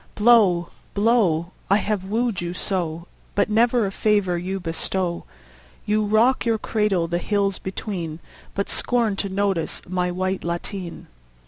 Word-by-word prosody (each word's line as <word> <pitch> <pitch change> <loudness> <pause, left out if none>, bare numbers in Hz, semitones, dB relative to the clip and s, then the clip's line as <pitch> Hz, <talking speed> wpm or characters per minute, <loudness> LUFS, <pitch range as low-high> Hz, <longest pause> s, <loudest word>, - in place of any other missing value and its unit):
Blow, 205 -6 +5 0.3
blow! 200 -6 +2 0.2
I 200 - +6
have 210 -2 -1
wooed 220 0 -1
you 175 0 -4
so, 170 -4 -2 0.3
But 205 - +2
never 235 +1 +3
a 195 - -2
favour 205 -3 +1
you 185 +3 -3
bestow. 175 +1 -2 0.6
You 215 +1 +2
rock 220 +5 +3
your 230 -1 +2
cradle 210 -6 0
the 170 +1 -1
hills 200 0 0
between, 185 -5 -4 0.4
But 200 - -1
scorn 235 -4 +1
to 200 - -1
notice 195 -3 -1
my 180 0 0
white 185 +1 -2
lateen. 170 +1 -4
195 Hz, 140 wpm, -23 LUFS, 175-215 Hz, 0.6 s, I